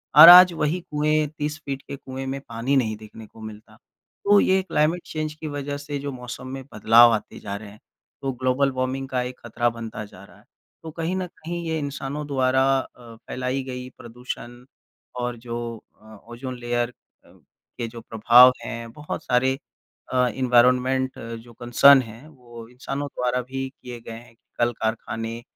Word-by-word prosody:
और 160 +3 +12
आज 180 0 +10
वही 155 +3 -1
कुएँ 150 +1 +1
30 150 +1 -3
फीट 135 -1 -4
के 140 - -5
कुएँ 135 -1 -7
में 135 +1 -3
पानी 115 +4 -1
नहीं 110 -4 0
देखने 110 +1 -12
को 110 - -16
मिलता। 110 0 -11 0.5
तो 205 0 +6
ये 190 0 +3
क्लाइमेट 165 -1 +1
चेंज 155 -1 -4
की 155 0 -8
वज़ह 145 -1 -4
से 145 0 -5
जो 140 0 -4
मौसम 125 0 -8
में 135 +1 -6
बदलाव 115 +3 +6
आते 110 - -4
जा 100 - -6
रहे 105 0 -8
हैं, 105 +1 -16 0.4
तो 135 -1 -1
ग्लोबल 130 +2 +1
वार्मिंग 130 +1 -3
का 125 -1 0
एक 125 0 -6
ख़तरा 120 +1 0
बनता 115 -2 -7
जा 100 -1 -15
रहा 100 - -17
है। 105 - -23 0.4
तो 160 - -7
कहीं 165 +3 -2
न 185 - -2
कहीं 170 +2 -5
ये 160 - -1
इंसानों 145 +1 -4
द्वारा 130 -2 +2 0.2
अ, 120 -3 -11
फैलाई 130 +1 -2
गई 125 -1 -7
प्रदूषण 120 0 -8 0.7
और 120 -1 -3
जो 115 0 -7 0.5
अ, - - -21 0.3
ओजोन 125 +1 -6
लेयर 120 0 -1 0.4
अ, - - -20 0.5
के 115 - -3
जो 115 0 -10
प्रभाव 120 +3 +6
हैं 115 0 -6
बहुत 150 +4 -6
सारे 130 +2 +2 0.6
अ, 125 -1 +3
एनवायरनमेंट 125 +1 +2 0.2
जो 120 - -16
कंसर्न 130 +4 +6
है, 115 +5 -11
वो 120 -6 -13
इंसानों 135 +3 -5
द्वारा 125 0 -1
भी 135 +2 -5
किए 125 -2 -10
गए 115 - -10
हैं 115 +1 -11
कि - - -48 0.2
कल 120 0 +3
कारखाने 115 +1 -3
130 Hz, 180 wpm, -24 LUFS, 120-140 Hz, 0.7 s, और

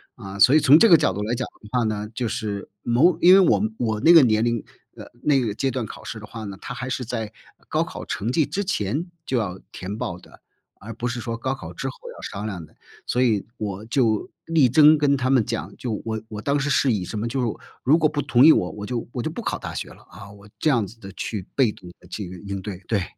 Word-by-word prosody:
啊， 100 0 -9
所 125 +7 +6
以 - - +7
从 145 0 +7
这 230 +7 +6
个 170 - +9
角 145 - +3
度 105 +2 -4
来 110 - -1
讲 125 +1 -2 0.2
的 105 - -14
话 125 -1 +1
呢， 105 -1 -2
就 120 +1 -2
是 105 -3 -4
某 145 +9 +3
因 180 +1 +7
为 195 - +8
我 190 +2 +4 0.2
我 110 -2 0
那 170 - +7
个 165 - +10
年 110 -3 +3
龄， 115 -2 0 0.3
呃， - - -10 0.2
那 145 -2 +4
个 105 -4 -2
阶 135 +2 0
段 120 -3 -3
考 - - -10
试 110 - -6
的 105 - -10
话 110 0 -8
呢， 100 -2 -6
它 125 - -6
还 130 0 -5
是 130 0 -2
在 110 -2 -4 0.3
高 - - +1
考 - - -8
成 110 +5 -2
绩 155 +2 +2
之 175 +9 -3
前 155 - -2 0.2
就 130 - 0
要 95 -4 -3
填 100 +3 -6
报 85 -4 -4
的， - - -18 0.4
而 110 +3 -8
不 120 +2 -4
是 125 0 -3
说 115 0 -4
高 130 +3 -2
考 - - -9
之 - - -4
后 - - -4 0.2
要 - - -12
商 100 +2 -6
量 95 -6 -5
的。 - - -17 0.3
所 125 +1 +2
以 110 -5 +1
我 100 -1 -4
就 115 -3 +1 0.2
力 160 -6 +3
争 150 +3 +6
跟 140 -1 +3
他 130 +1 0
们 125 -5 +4
讲， 115 0 -4
就 120 -4 -3
我 110 -1 -3
我 105 -2 -7
当 145 0 +1
时 145 - -1
是 135 -3 +3
以 95 -4 -1
什 105 - -5
么 110 - -2
就 130 +2 -2
是 120 - +1 0.4
如 150 +6 +5
果 155 - +3
不 145 -1 -2
同 130 -2 +4
意 160 - +10
我， 90 - +2
我 105 0 -7
就 120 -1 -4
我 120 - -3
就 160 - -2
不 235 - -6
考 - - -2
大 - - -7
学 - - -5
了， - - -16
啊， 100 +1 -11
我 100 0 -15
这 155 - +2
样 120 -7 +2
子 115 +4 -14
地 95 -2 -10
去 100 -2 -5
被 130 -6 +3
动 90 - -13
地 - - -18
去 105 -4 -6 0.2
应 100 -1 -4
对， 100 -3 -6
对。 100 -5 +1
115 Hz, 285 characters per minute, -23 LUFS, 105-135 Hz, 0.4 s, 个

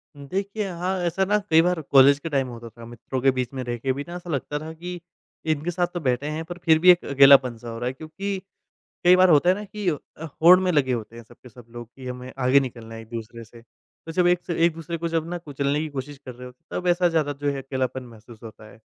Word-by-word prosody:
देखिए 195 +8 -4
हाँ, 180 +2 -3
ऐसा 190 +3 0
ना 210 +2 +2
कई 160 0 +6
बार 175 -1 0
कॉलेज 140 0 +5
के 165 - -6
टाइम 135 -3 0
होता 115 -1 -9
था, 115 +1 -13
मित्रों 120 +2 -6
के 135 0 +4
बीच 130 -1 -3
में 130 -1 -4
रह 120 -1 -4
के 130 +2 -1
भी 140 +2 -5
ना 175 - -7
ऐसा 175 0 -9
लगता 145 0 -3
था 160 +1 -7
कि 175 +2 -7 0.5
इनके 155 +2 -1
साथ 175 0 0
तो 175 - -3
बैठे 130 0 -1
हैं, 155 +1 -4
पर 175 +1 -8
फिर 160 -1 +5
भी 180 +2 +8
एक 175 - +1
अकेलापन 135 -3 +6
सा 120 +1 -9
हो 115 - -6
रहा 120 - -2
है 130 - -2
क्योंकि 190 +7 -5 0.7
कई 180 +1 +7
बार 185 0 +5
होता 165 +2 +5
है 185 - +4
ना 210 - -6
कि 205 -1 -6
अ, 155 +1 -7 0.2
होड़ 180 +3 +8
में 185 -1 +1
लगे 135 -5 +2
होते 115 0 -5
हैं 120 - -10
सब - - -19
के 125 - -12
सब 120 -1 -15
लोग 120 -1 -10
कि 130 -1 -10
हमें 125 0 -7
आगे 130 +2 +4
निकलना 115 -4 -7
है 115 - -8
एक-दूसरे 115 +1 -8
से। 115 +1 -16
तो 160 +6 -15
जब 175 +1 +2
एक 180 0 +2
से 170 - -3
एक-दूसरे 165 0 -2
को 170 +1 -3
जब 165 0 -2
ना 175 - -3
कुचलने 145 -3 -2
की 155 - -3
कोशिश 140 0 -7
कर 125 - -7
रहे 125 +1 -10
हो, 125 - -13 0.2
तब 180 - -3
ऐसा 175 0 +3
ज़्यादा 155 -3 0
जो 145 0 +1
है 135 -1 -5
अकेलापन 130 -1 -3
महसूस 115 -1 -15
होता 110 -1 -11
है, - - -18
145 Hz, 265 wpm, -24 LUFS, 125-175 Hz, 0.7 s, भी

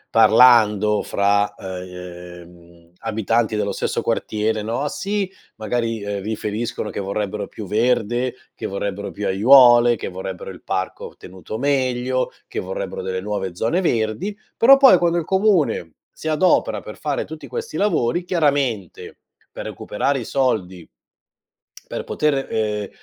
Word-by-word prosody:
parlando 110 -2 +5
fra, 100 0 +1
uhm, 90 -2 -10
abitanti 110 0 0
dello 100 -1 -1
stesso - - -2
quartiere, 110 0 -1
no, 115 +7 -2
sì, 200 +3 -2 0.3
magari, 115 0 -2
uhm, 100 -1 -3
riferiscono 110 +1 -3
che - - -5
vorrebbero 100 +1 -3
più 110 - -8
verde, 120 +2 +1 0.2
che 110 - -7
vorrebbero 100 0 -4
più 105 0 -4
aiuole, 120 +3 +6
che - - -5
vorrebbero 95 0 -6
il 90 - -13
parco 95 -1 -4
tenuto 95 +4 -8
meglio, 130 -1 0 0.2
che - - -4
vorrebbero - - -5
delle 95 0 -3
nuove 95 -3 -4
zone 145 - 0
verdi, 140 - -1 0.2
però 270 +4 +7
poi 265 -8 +7
quando 175 0 +1
il 165 - -1
comune 190 - +1 0.2
si 160 - -5
adopera 185 - +2
per - - -10
fare - - -2
tutti - - -9
questi 465 0 -6
lavori, 175 - +1
chiaramente, 140 - -1 0.3
per - - -8
recuperare 135 +6 -2
i 120 - -5
soldi 95 -10 -1 1.0
per - - -5
poter, 145 -3 0
uhm, 105 -2 -2
110 Hz, 135 wpm, -21 LUFS, 100-135 Hz, 1.0 s, però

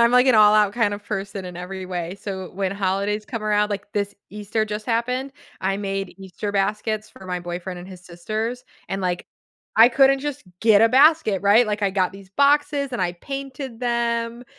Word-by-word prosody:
I'm, 235 0 +5
like, 250 +1 +6
an 255 - +5
all 210 -1 +7
out 210 -2 +4
kind 205 -3 +1
of 205 - -9
person 195 -1 -4
in 180 -1 -8
every 185 +1 -6
way. 180 0 -4
So 190 -3 -6
when 195 0 -2
holidays 200 +2 -1
come 225 0 -5
around, 210 0 +1
like, 200 0 -4
this 205 -1 -2 0.2
Easter 210 +1 -2
just 210 0 -5
happened, 250 +3 -1 0.3
I 195 +1 0
made 195 -2 -4
Easter 195 +2 -5
baskets 210 +2 -1
for 190 - -13
my 180 -1 -3
boyfriend 175 +1 -6
and 180 - -10
his 185 -1 -12
sisters, 215 +8 -4 0.2
and, 195 - -3
like, 180 -1 -2 0.5
I 225 +2 +9
couldn't 270 +2 +4
just 290 0 -5 0.2
get 220 -2 +5
a 225 - +6
basket, 270 - +4
right? 210 +4 +5
Like, 210 0 -2
I 200 - +2
got 185 -2 0
these 195 -1 -13
boxes, 280 +3 +2
and 240 - -2
I 175 -1 0
painted 270 +2 -7
them, 235 0 -1
210 Hz, 200 wpm, -23 LUFS, 195-235 Hz, 0.5 s, I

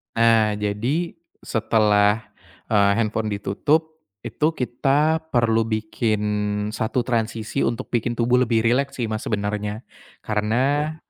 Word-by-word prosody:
Nah, 115 -2 +4
jadi 115 +12 -1 0.3
setelah, 105 -1 +2 0.5
eee, 100 -1 +4
handphone 110 -1 -1
ditutup 150 +11 -1 0.3
itu 135 +7 0
kita 145 +5 +1
perlu 115 -3 +2
bikin 110 0 -1 0.5
satu 115 +3 -1
transisi 115 +1 -2
untuk 115 -1 -4
bikin 120 0 0
tubuh 120 +1 +3
lebih 115 -2 +2
rileks 140 +4 +1
sih 120 - -1
Mas 110 - -4
sebenernya. 105 +1 -2 0.4
Karena 130 +9 0
115 Hz, 115 wpm, -22 LUFS, 105-125 Hz, 0.5 s, Nah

